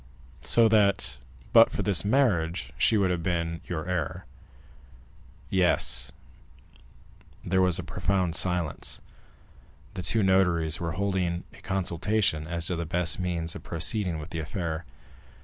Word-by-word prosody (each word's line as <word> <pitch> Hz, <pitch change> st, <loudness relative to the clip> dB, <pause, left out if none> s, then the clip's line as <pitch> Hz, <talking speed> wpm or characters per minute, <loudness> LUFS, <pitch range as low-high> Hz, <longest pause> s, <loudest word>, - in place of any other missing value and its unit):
"So 115 Hz, -1 st, +4 dB
that, 100 Hz, -, +2 dB, 0.3 s
but -, -, +8 dB
for -, -, -3 dB
this 95 Hz, -4 st, +3 dB
marriage, 90 Hz, -, +1 dB
she 110 Hz, -, +3 dB
would 95 Hz, -3 st, +2 dB
have 90 Hz, -1 st, -1 dB
been 85 Hz, -1 st, -2 dB
your 85 Hz, -1 st, -4 dB
heir?" 90 Hz, 0 st, -3 dB, 1.3 s
"Yes." 90 Hz, -2 st, +2 dB, 1.3 s
There 95 Hz, +1 st, +2 dB
was 90 Hz, -2 st, +3 dB
a -, -, -4 dB
profound 95 Hz, -3 st, -1 dB
silence. 90 Hz, -3 st, 0 dB, 0.9 s
The 90 Hz, -, -5 dB
two 110 Hz, +4 st, +1 dB
notaries 90 Hz, -4 st, +2 dB
were 85 Hz, -2 st, -3 dB
holding 95 Hz, -2 st, -1 dB
a -, -, -16 dB
consultation 95 Hz, -3 st, 0 dB
as 85 Hz, -1 st, -3 dB
to 90 Hz, -, -1 dB
the 85 Hz, 0 st, -3 dB
best 85 Hz, +1 st, +1 dB
means 85 Hz, -3 st, -2 dB
of -, -, -7 dB
proceeding 85 Hz, +2 st, 0 dB
with 75 Hz, -1 st, -8 dB
the 80 Hz, -, -4 dB
affair. 80 Hz, 0 st, -4 dB
90 Hz, 135 wpm, -27 LUFS, 85-95 Hz, 1.3 s, but